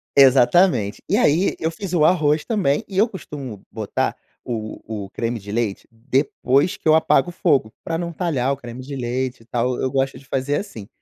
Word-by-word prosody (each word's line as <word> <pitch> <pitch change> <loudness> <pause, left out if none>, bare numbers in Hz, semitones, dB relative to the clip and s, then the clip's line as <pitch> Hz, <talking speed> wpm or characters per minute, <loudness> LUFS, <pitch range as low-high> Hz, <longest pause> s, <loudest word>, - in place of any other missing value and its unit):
Exatamente 130 - +5
e 200 - +2
aí 180 -4 +3
eu 160 +1 -1
fiz 185 +1 -6
o 155 -3 +3
arroz 155 -3 +3
também 185 -11 +1
e 195 - -6
eu 215 +4 +5
costumo 140 - -8
botar 110 -2 -2 0.3
o 110 -3 -5 0.3
o - - -13
creme 115 +1 -3
de 100 +1 -9
leite 110 -4 -2
depois 130 +5 +1
que - - -39
eu 155 - +7
apago 160 0 +3
o - - -6
fogo 140 - +1
para 165 - -2
não 170 0 -3
talhar 150 -7 -1
o 140 - -1
creme 120 -1 -9
de 140 +1 -8
leite 125 0 -3
e - - -25
tal 120 +1 -1
eu 130 - 0
gosto 135 0 -1
de 135 - -19
fazer 135 +2 -1
assim. 110 - -7
135 Hz, 200 wpm, -21 LUFS, 120-165 Hz, 0.3 s, eu